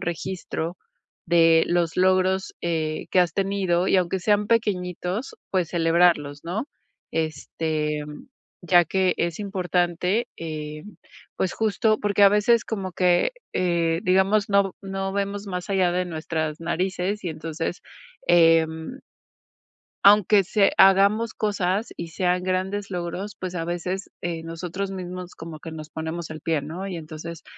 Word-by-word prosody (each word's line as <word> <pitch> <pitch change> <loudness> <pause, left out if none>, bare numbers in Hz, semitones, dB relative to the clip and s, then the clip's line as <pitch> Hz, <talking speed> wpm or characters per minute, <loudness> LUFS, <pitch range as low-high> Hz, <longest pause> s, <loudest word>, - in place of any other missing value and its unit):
registro 175 0 -4 0.5
de 165 -1 +5
los 175 -2 +1
logros, 185 +1 +2
eh, 160 -2 -2
que 185 - +5
has 175 -2 +2
tenido 190 -3 +1
y - - +2
aunque 185 +1 +1
sean 205 +2 +2
pequeñitos, 190 -1 -1 0.2
pues, 185 -4 +1
celebrarlos, 165 -4 +2
¿no?, 200 +10 -3 0.5
este, 155 -1 -2
mm, 150 0 -10 0.4
ya 175 0 +5
que 185 +2 +1
es 170 -1 -1
importante, 180 +1 0
eh, 155 -2 -6 0.5
pues, 185 - 0
justo 215 0 +1
porque 205 0 +3
a - - +9
veces 210 +3 +3
como 195 -4 -4
que, 180 - +3 0.2
eh, 170 -2 +1
digamos, 190 +3 +3
no 200 0 +4
v - - -6
no 195 0 -3
vemos 200 +1 -2
más 180 -1 -5
allá 185 -3 +2
de 180 +1 0
nuestras 155 -2 -3
narices 185 +4 -2
y - - -1
entonces, 160 +2 -4 0.5
em 165 +4 +3 1.1
aunque 200 0 +6
se 200 +1 +3
hagamos 200 +4 +5
cosas 200 0 0
y 170 - -5
sean 180 +2 0
grandes 190 +2 -2
logros, 180 +3 -4
pues, 185 -1 -5
a 165 -2 -3
veces, 180 +3 -3
eh, 165 -1 -3
nosotros 175 +4 -5
mismos 180 -1 -7
como 160 -1 -9
que 165 - -8
nos 155 -1 -8
ponemos 160 +1 -5
el 155 0 -7
pie, 160 -3 0
¿no? 170 +7 -6
Y 185 - -4
entonces, 165 +1 -8
180 Hz, 145 wpm, -24 LUFS, 165-195 Hz, 1.1 s, a